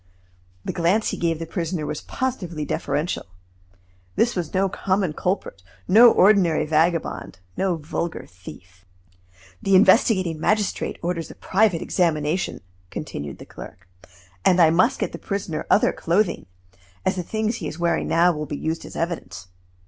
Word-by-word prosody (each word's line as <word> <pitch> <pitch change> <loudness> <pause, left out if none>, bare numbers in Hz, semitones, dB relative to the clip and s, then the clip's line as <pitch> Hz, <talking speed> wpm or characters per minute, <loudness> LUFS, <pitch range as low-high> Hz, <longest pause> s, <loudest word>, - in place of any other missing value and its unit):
The - - -2
glance 185 +5 +1
he - - -3
gave 165 -2 0
the 165 - -5
prisoner 165 -1 -3
was 150 - -4
positively 180 -12 -3
deferential. 145 - -2 0.9
This 240 - +2
was 175 -4 -3
no 195 +1 +2
common 190 -2 -1
culprit, 180 - -3 0.3
no 225 +6 +8
ordinary 185 -5 +4
vagabond, 160 - 0 0.2
no 190 -2 0
vulgar 160 +2 -4
thief. 90 +1 -14 0.8
"The 195 -1 +3
investigating 185 -4 +4
magistrate 210 +4 0
orders 170 -1 -2
a - - -11
private 190 -4 +1
examination," 165 - 0 0.3
continued 70 -5 -6
the - - -11
clerk, 90 0 -12 0.6
"and 180 - +4
I 160 -2 +6
must 175 +3 +3
get - - -2
the - - -8
prisoner 195 -5 -4
other 210 - +4
clothing, 180 - 0 0.6
as 190 - +1
the 180 - -2
things 220 +5 -2
he 165 - -5
is 155 - -6
wearing 170 0 0
now 175 +2 +4
will 150 -1 -5
be 145 - -4
used 160 +1 -3
as - - -10
evidence. 165 - -4
170 Hz, 150 wpm, -23 LUFS, 155-190 Hz, 0.9 s, no